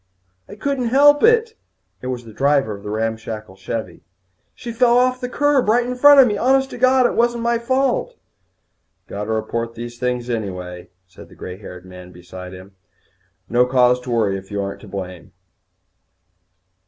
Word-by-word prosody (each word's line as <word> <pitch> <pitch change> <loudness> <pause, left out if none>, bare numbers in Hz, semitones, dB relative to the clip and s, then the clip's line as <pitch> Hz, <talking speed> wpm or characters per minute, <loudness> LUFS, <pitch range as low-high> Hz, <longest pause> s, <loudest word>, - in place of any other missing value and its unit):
"I 205 - -9
couldn't 255 +2 -2
help 290 +4 +5
it." 460 0 +4 0.5
It 125 - -6
was 125 -2 -4
the 110 - -12
driver 135 -4 +1
of 100 - -12
the 105 - -7
ramshackle 110 -2 -4
Chevvie. 95 -1 -6 0.5
"She 240 - -7
fell 240 +1 +3
off 255 +1 +2
the 250 - -3
curb 290 -3 +1
right 240 +2 +3
in 250 - -3
front 285 +3 +7
of 265 - +9
me. 210 -4 -1
Honest 265 +2 +2
to - - -8
God, 255 0 +4
it - - +1
wasn't 235 0 +1
my 235 0 +1
fault." 260 +1 0 0.9
"Got 105 +1 -6
to - - -8
report 115 +1 -3
these 120 0 -8
things 125 -1 -2
right 115 -3 -2
away," 90 -2 -8 0.2
said 90 - -15
the - - -17
grey 90 0 -8
haired 90 -3 -11
man 90 -1 -12
beside 90 +1 -11
him. 95 +1 -12 0.8
"No 125 +1 +2
cause 125 -1 +3
to 125 - -9
worry 110 -5 +1
if 95 - -17
you 100 -1 -3
ain't 100 - -7
to 110 - -14
blame." 95 -3 -8
125 Hz, 185 wpm, -20 LUFS, -, 0.9 s, of